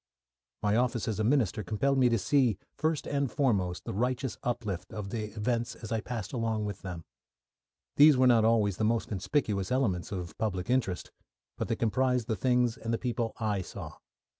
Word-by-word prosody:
My 105 0 +2
office 120 -2 0
as 110 -2 -2
a - - +2
minister 115 -4 +2
compelled 135 +8 +1
me 125 -1 +5
to 115 - +2
see, 120 0 +2 0.2
first 160 -1 0
and 140 -3 -1
foremost, 100 - 0
the - - -4
righteous 125 +2 -1
uplift 105 -7 -3
of 100 -2 -5
the 110 -2 -2
events 115 +2 -1
as 110 - -9
I 110 -1 0
passed 115 -2 -5
along 115 -3 -1
with 100 -3 -5
them. 90 -4 -7 0.9
These 145 -1 +8
were 130 - +5
not 120 -3 +5
always 110 -4 +3
the - - -1
most 115 +1 +1
conspicuous 100 -1 -1
elements 110 -10 0
of 90 -3 -5
public 105 -1 -1
interest, 120 -9 0 0.4
but - - -3
they - - 0
comprised 125 +1 +1
the 110 - 0
things 125 -1 +2
and 115 - -4
the 115 - +1
people 120 -2 -2
I 105 -4 0
saw. - - -8
115 Hz, 190 wpm, -30 LUFS, 105-125 Hz, 0.9 s, These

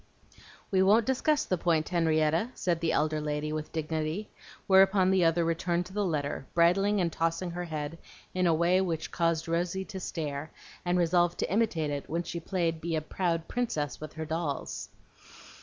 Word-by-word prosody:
"We 190 -1 +3
won't 210 +4 +5
discuss 280 +4 +1
the 185 - -1
point, 160 -3 +1
Henrietta," 165 +3 +2
said 175 -2 0
the 165 -1 0
elder 155 0 +1
lady 150 0 -2
with 155 0 -4
dignity; 160 +4 -3 0.3
whereupon 190 0 +5
the 190 -2 +3
other 165 +1 +3
returned 170 +1 0
to 185 - -12
the 205 0 0
letter, 145 -6 -2
bridling 195 +5 +4
and 170 -3 0
tossing 165 +2 -1
her 175 +1 -4
head 155 0 -5 0.3
in 185 -1 +2
a 165 - +4
way 175 +3 +3
which 165 -4 -2
caused 165 -1 0
Rosy 175 +3 -1
to 190 - -7
stare, 155 -4 -4 0.3
and 175 0 +1
resolve 175 0 +2
to - - -2
imitate 185 -9 +1
it 145 -1 -4
when 170 +2 -1
she 170 0 -5
played 165 -2 -1
being 165 -1 -1
a - - -1
proud 165 0 -1
princess 155 - -2
with 155 - -7
her 160 0 -5
dolls. 160 -3 -3
170 Hz, 180 wpm, -29 LUFS, 155-185 Hz, 0.3 s, won't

